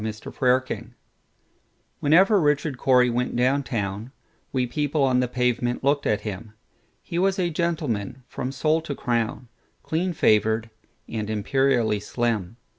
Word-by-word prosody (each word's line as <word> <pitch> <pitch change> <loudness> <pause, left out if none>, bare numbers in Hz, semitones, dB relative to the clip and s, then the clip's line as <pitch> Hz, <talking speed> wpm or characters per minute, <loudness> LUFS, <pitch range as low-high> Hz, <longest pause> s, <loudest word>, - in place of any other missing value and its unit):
Richard 110 -1 -6
Cory 130 0 +3 1.4
WHENEVER 185 +7 +5
Richard 145 -1 +1
Cory 125 -2 +4
went 125 +1 -1
down 130 +4 +2
town, 105 -2 -4 0.4
We 130 -2 0
people 145 +3 -1
on 130 -2 +3
the 125 - +1
pavement 125 0 -1
looked 140 +1 +2
at 105 - +1
him:He 110 - -8
was 195 +1 +2
a 175 -2 0
gentleman 140 - -2
from 125 - -4
sole 155 +4 +1
to 145 -3 -5
crown, 120 0 -2 0.4
Clean 175 +3 -1
favored, 110 - +2 0.4
and 110 -2 -4
imperially 120 0 +1
slim. 110 -1 -2
125 Hz, 130 wpm, -24 LUFS, 115-145 Hz, 1.4 s, WHENEVER